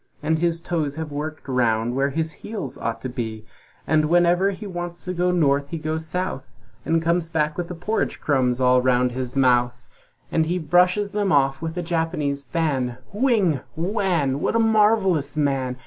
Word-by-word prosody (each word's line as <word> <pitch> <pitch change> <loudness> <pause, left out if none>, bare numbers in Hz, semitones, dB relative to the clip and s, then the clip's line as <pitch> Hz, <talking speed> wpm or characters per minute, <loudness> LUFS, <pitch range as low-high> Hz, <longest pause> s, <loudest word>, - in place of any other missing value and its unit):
And 160 +1 +1
his 170 0 0
toes 155 -5 -2
have 160 -1 -5
worked 150 +1 -5
round 120 -2 +1
where 135 +1 +1
his 160 +3 -2
heels 215 -2 -5
ought 115 - -4
to - - -2
be. 110 -3 -5 0.4
So 155 0 +3
whenever 175 +3 +3
he 200 +2 -6
wants 175 -2 -6
to 180 - -3
go 180 0 +1
North 145 -5 +2
he 165 - -4
goes 160 +1 -3
South, 170 -6 -4 0.3
And 165 0 +1
comes 170 0 +1
back 155 -1 0
with 175 -1 -3
the 180 - -6
porridge 205 +7 -2
crumbs 130 -4 +1
all 125 0 +4
round 125 0 +2
his 125 0 -4
mouth, 120 -2 +2 0.5
And 160 -1 +1
he 175 +2 0
brushes 180 +5 +2
them 205 -2 0
off 135 -2 +2
with 165 +1 -4
a 175 - -1
Japanese 160 -4 -1
fan, 130 -4 -1 0.2
Whing! 205 - +2 0.2
Whann! 170 -6 0
What - - 0
a - - +4
marvelous 210 -9 +2
man! 135 -4 0
160 Hz, 180 wpm, -23 LUFS, 135-175 Hz, 0.5 s, all